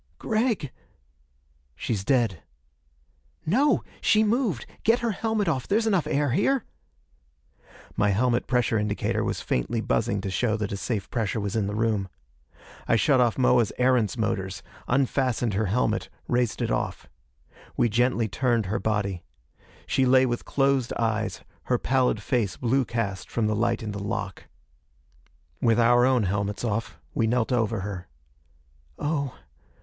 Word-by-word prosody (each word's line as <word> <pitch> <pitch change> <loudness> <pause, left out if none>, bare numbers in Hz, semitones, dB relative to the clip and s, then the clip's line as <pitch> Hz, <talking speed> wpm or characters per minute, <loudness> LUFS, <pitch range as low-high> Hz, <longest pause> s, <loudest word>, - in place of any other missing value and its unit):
"Gregg!" 220 - 0 1.0
"She's 100 - -2
dead." 115 - +1 1.0
"No! 265 - +3 0.2
She 215 0 +4
moved! 215 - 0 0.2
Get 225 +2 +4
her 235 -1 0
helmet 215 0 -1
off! 135 -7 -1
There's 220 +3 +2
enough 195 -7 +1
air 145 -2 +1
here." 235 - +2 1.3
My 105 - +2
helmet 120 +4 +1
pressure 125 -3 +1
indicator 105 -1 -1
was - - -2
faintly 115 - -1
buzzing 110 -1 0
to 95 - -4
show 110 +2 0
that 105 -2 -3
a - - -2
safe 100 -2 -3
pressure 110 -2 -1
was 100 0 -3
in 105 -3 +1
the 105 - -3
room. 105 -3 0 0.8
I - - +4
shut 130 +2 +4
off 120 -2 +2
Moa's 125 -3 +3
Erentz 125 -5 +2
motors, - - -2 0.2
unfastened 125 -3 +1
her 105 +2 0
helmet, 110 +2 0 0.2
raised 120 -3 0
it - - -1
off. - - -2 0.7
We - - +4
gently 120 +1 +1
turned 120 0 0
her 105 +5 -1
body. 100 -4 -1 0.6
She 130 -1 +2
lay 130 +1 +5
with 120 -1 -2
closed 135 -3 +1
eyes, 110 -1 -1 0.2
her - - +2
pallid 125 -5 +1
face 115 -8 0
blue 130 +2 +1
cast 100 -6 -3
from 115 - 0
the 105 0 +1
light 115 +1 0
in 105 - -4
the 100 - -5
lock. 100 -3 -4 1.2
With 115 0 +3
our 120 +1 +5
own 130 -4 +3
helmets 100 +2 -2
off, 115 -1 -2 0.2
we 115 - +1
knelt 120 +1 +1
over 115 -4 +1
her. 95 -3 -6 0.9
"Oh. 145 -4 -2
120 Hz, 150 wpm, -26 LUFS, 105-130 Hz, 1.3 s, lay